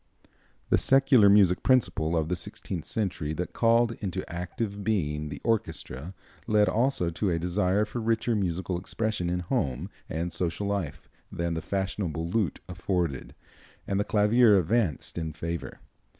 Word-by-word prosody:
The -, -, +5 dB
secular 135 Hz, -6 st, +5 dB
music 100 Hz, -3 st, +5 dB
principle 85 Hz, -10 st, +2 dB
of 80 Hz, -1 st, 0 dB
the 90 Hz, -, 0 dB
sixteenth 85 Hz, -1 st, -6 dB
century 90 Hz, -8 st, -2 dB
that 90 Hz, +3 st, -4 dB
called 115 Hz, 0 st, +3 dB
into 95 Hz, -2 st, -3 dB
active 100 Hz, +4 st, -4 dB
being 75 Hz, -8 st, -1 dB
the 70 Hz, -1 st, -6 dB
orchestra 90 Hz, -, -2 dB, 0.3 s
led 105 Hz, -1 st, +4 dB
also 110 Hz, -4 st, +1 dB
to 95 Hz, +4 st, -1 dB
a 85 Hz, -, +1 dB
desire 90 Hz, +4 st, +1 dB
for 115 Hz, +3 st, -5 dB
richer 115 Hz, +1 st, +1 dB
musical 90 Hz, -2 st, -1 dB
expression 105 Hz, -1 st, -2 dB
in 90 Hz, +1 st, -1 dB
home 80 Hz, +1 st, -2 dB, 0.2 s
and 85 Hz, +2 st, -3 dB
social 90 Hz, +3 st, -2 dB
life 100 Hz, -7 st, -3 dB, 0.2 s
than 85 Hz, 0 st, -2 dB
the 80 Hz, -, -3 dB
fashionable 95 Hz, -3 st, -2 dB
lute 95 Hz, -3 st, -1 dB
afforded, 90 Hz, -5 st, -2 dB, 0.5 s
and 100 Hz, 0 st, -1 dB
the -, -, +2 dB
clavier 105 Hz, +1 st, +4 dB
advanced 90 Hz, -, 0 dB
in 80 Hz, -2 st, -4 dB
favor. 85 Hz, +3 st, -5 dB
90 Hz, 150 wpm, -27 LUFS, 85-105 Hz, 0.5 s, The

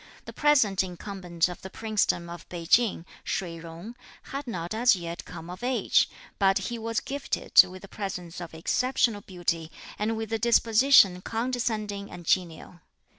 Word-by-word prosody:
The -, -, -9 dB
present 260 Hz, -11 st, +3 dB
incumbent 180 Hz, -2 st, -2 dB
of 180 Hz, -, -8 dB
the 190 Hz, -, -8 dB
Princedom 210 Hz, -5 st, 0 dB
of 170 Hz, 0 st, -10 dB
Pei 170 Hz, -2 st, -6 dB
Ching, 210 Hz, -2 st, +3 dB, 0.2 s
Shih 170 Hz, -3 st, -3 dB
Jung, 170 Hz, +8 st, -9 dB, 0.4 s
had 275 Hz, 0 st, -4 dB
not 175 Hz, -4 st, -4 dB
as 235 Hz, 0 st, +4 dB
yet 170 Hz, -1 st, -6 dB
come 165 Hz, -, -9 dB
of 180 Hz, +2 st, -8 dB
age, 250 Hz, 0 st, +2 dB, 0.3 s
but 195 Hz, -1 st, +4 dB
he 235 Hz, -1 st, -3 dB
was 230 Hz, 0 st, -1 dB
gifted 280 Hz, -7 st, +3 dB
with 185 Hz, +1 st, -11 dB
a -, -, -9 dB
presence 180 Hz, -4 st, -6 dB
of 170 Hz, -2 st, -8 dB
exceptional 230 Hz, +5 st, +1 dB
beauty, 175 Hz, -4 st, -3 dB, 0.3 s
and 220 Hz, +2 st, 0 dB
with 225 Hz, 0 st, -4 dB
a 225 Hz, -, 0 dB
disposition 225 Hz, -4 st, +5 dB
condescending 220 Hz, -3 st, -2 dB
and 175 Hz, -, -10 dB
genial. 175 Hz, 0 st, -1 dB
195 Hz, 160 wpm, -27 LUFS, 175-230 Hz, 0.4 s, disposition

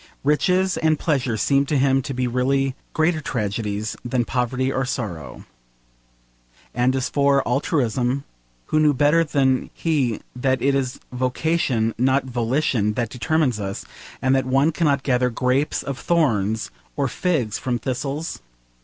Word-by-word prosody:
Riches 180 Hz, +6 st, +2 dB
and 160 Hz, -1 st, +2 dB
pleasure 130 Hz, -8 st, 0 dB
seemed 140 Hz, +5 st, +2 dB
to 150 Hz, -, +1 dB
him 135 Hz, 0 st, +3 dB
to 135 Hz, +1 st, -5 dB
be 125 Hz, 0 st, 0 dB
really 130 Hz, +2 st, +1 dB, 0.2 s
greater 160 Hz, 0 st, +1 dB
tragedies 105 Hz, -3 st, -2 dB
than 120 Hz, 0 st, 0 dB
poverty 130 Hz, +2 st, -1 dB
or 135 Hz, 0 st, 0 dB
sorrow. 95 Hz, -, -5 dB, 1.3 s
And 125 Hz, +2 st, +2 dB
as 130 Hz, -1 st, 0 dB
for 140 Hz, -1 st, +2 dB
altruism, 125 Hz, -1 st, 0 dB, 0.4 s
who 155 Hz, -, +1 dB
knew 150 Hz, -2 st, +4 dB
better 150 Hz, +5 st, +4 dB
than 135 Hz, -4 st, +1 dB
he 140 Hz, -9 st, 0 dB
that 130 Hz, +1 st, +1 dB
it 140 Hz, +1 st, +2 dB
is 130 Hz, -2 st, -1 dB
vocation 125 Hz, -2 st, 0 dB
not 130 Hz, +2 st, +2 dB
volition 120 Hz, -3 st, 0 dB
that 115 Hz, 0 st, -2 dB
determines 145 Hz, -3 st, 0 dB
us, 100 Hz, -1 st, -4 dB, 0.4 s
and 130 Hz, 0 st, +3 dB
that 135 Hz, -1 st, +1 dB
one 135 Hz, +5 st, +3 dB
cannot 145 Hz, -4 st, +1 dB
gather 125 Hz, -2 st, +2 dB
grapes 125 Hz, +4 st, 0 dB
of 140 Hz, -1 st, -5 dB
thorns 110 Hz, -, +1 dB, 0.2 s
or 140 Hz, -2 st, 0 dB
figs 130 Hz, -, -1 dB
from 125 Hz, -2 st, -1 dB
thistles? 135 Hz, -, -4 dB
130 Hz, 145 wpm, -22 LUFS, 125-145 Hz, 1.3 s, knew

